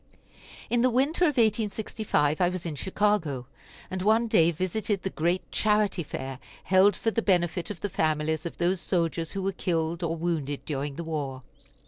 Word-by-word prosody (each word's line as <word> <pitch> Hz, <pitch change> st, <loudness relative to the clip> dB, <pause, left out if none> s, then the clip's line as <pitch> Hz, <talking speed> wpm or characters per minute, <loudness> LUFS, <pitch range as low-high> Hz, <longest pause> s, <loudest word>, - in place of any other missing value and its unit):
In 240 Hz, 0 st, +3 dB
the 255 Hz, -, +4 dB
winter 280 Hz, +8 st, +2 dB
of 295 Hz, -5 st, +1 dB
1865 210 Hz, -8 st, +1 dB
I 175 Hz, -, +4 dB
was 180 Hz, -1 st, -5 dB
in 165 Hz, -, -3 dB
Chicago, 175 Hz, -5 st, 0 dB, 0.5 s
and 185 Hz, 0 st, -3 dB
one 220 Hz, +4 st, +3 dB
day 170 Hz, -7 st, +4 dB
visited 185 Hz, +4 st, -2 dB
the 190 Hz, -, -2 dB
great 175 Hz, +4 st, -1 dB
charity 210 Hz, -3 st, +2 dB
fair 135 Hz, -4 st, -6 dB, 0.2 s
held 190 Hz, +1 st, +5 dB
for 225 Hz, -, 0 dB
the 230 Hz, -, 0 dB
benefit 175 Hz, -3 st, +1 dB
of 205 Hz, -5 st, -7 dB
the -, -, -1 dB
families 155 Hz, -3 st, 0 dB
of -, -, -9 dB
those 175 Hz, +1 st, +1 dB
soldiers 165 Hz, -2 st, -1 dB
who 195 Hz, -1 st, -3 dB
were 195 Hz, -, +1 dB
killed 170 Hz, -2 st, -1 dB
or 165 Hz, -1 st, -1 dB
wounded 160 Hz, -4 st, -2 dB
during 140 Hz, -1 st, -3 dB
the 170 Hz, -, -5 dB
war. 140 Hz, -5 st, -4 dB
180 Hz, 175 wpm, -27 LUFS, 160-210 Hz, 0.5 s, held